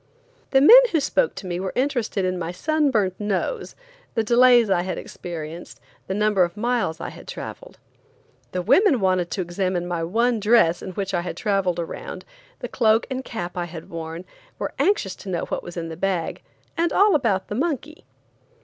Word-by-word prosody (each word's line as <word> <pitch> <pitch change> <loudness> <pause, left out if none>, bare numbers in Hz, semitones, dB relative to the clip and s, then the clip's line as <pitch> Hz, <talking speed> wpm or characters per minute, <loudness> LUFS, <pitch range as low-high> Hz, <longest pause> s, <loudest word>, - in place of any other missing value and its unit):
The 270 - +4
men 455 - +10
who 325 - +3
spoke 475 - +1
to - - -8
me 175 -1 -3
were 190 0 -4
interested 245 -7 0
in 185 0 -1
my 170 0 -3
sun 300 - +1
burnt 195 -7 0
nose, 210 - -2 0.4
the 225 - +2
delays 240 0 +5
I 190 -3 +2
had 185 +1 -4
experienced, 165 -1 -8 0.3
the 190 - -2
number 210 -2 +2
of 175 +3 -3
miles 230 -8 -1
I - - -5
had - - -13
traveled. - - -8 0.7
The 180 -1 -2
women 275 - +4
wanted 185 -3 +1
to 185 - -2
examine 175 0 -2
my 170 -2 -2
one 230 +7 +1
dress 210 -6 +3
in 185 - -7
which 195 +1 -3
I 175 - +1
had 180 - -6
traveled 195 -4 0
around, 170 - -6 0.4
the - - -3
cloak 225 -2 +2
and 260 0 -3
cap 180 -8 -6
I 175 -1 -2
had 165 -1 -10
worn, 165 +1 -6 0.3
were - - -4
anxious 365 - +1
to 195 - -9
know 175 -2 -2
what - - -3
was 175 0 -10
in 165 -1 -4
the 160 - -6
bag, 180 -3 -2 0.3
and 335 -1 +1
all 405 0 +4
about 220 -10 +1
the - - -5
monkey. 310 +4 -3
195 Hz, 195 wpm, -23 LUFS, 175-245 Hz, 0.7 s, men